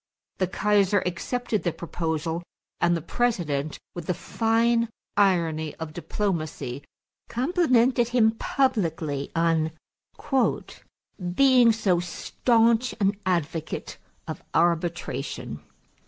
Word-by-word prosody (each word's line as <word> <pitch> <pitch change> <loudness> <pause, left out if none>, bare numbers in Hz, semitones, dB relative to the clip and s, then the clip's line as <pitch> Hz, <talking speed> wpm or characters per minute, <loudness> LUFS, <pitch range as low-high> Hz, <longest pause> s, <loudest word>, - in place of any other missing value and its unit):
The 185 - +2
Kaiser 205 0 +2
accepted 215 +5 -2
the 170 - 0
proposal 165 0 -3 0.4
and 175 0 +3
the 165 - -7
President, 165 -11 -1 0.2
with 175 -2 -7
the 180 - 0
fine 230 +2 +1 0.3
irony 165 -6 +2
of 160 -1 -7
diplomacy, 155 -6 -3 0.5
complimented 255 -4 +2
him 235 -2 +4
publicly 170 - -1
on 165 -1 +2 1.7
"being 255 -2 +6
so 205 -6 +1
stanch 230 +7 +1
an 200 0 +2
advocate 165 -3 -2 0.3
of - - -5
arbitration." 170 0 -1
185 Hz, 95 wpm, -26 LUFS, 165-230 Hz, 1.7 s, being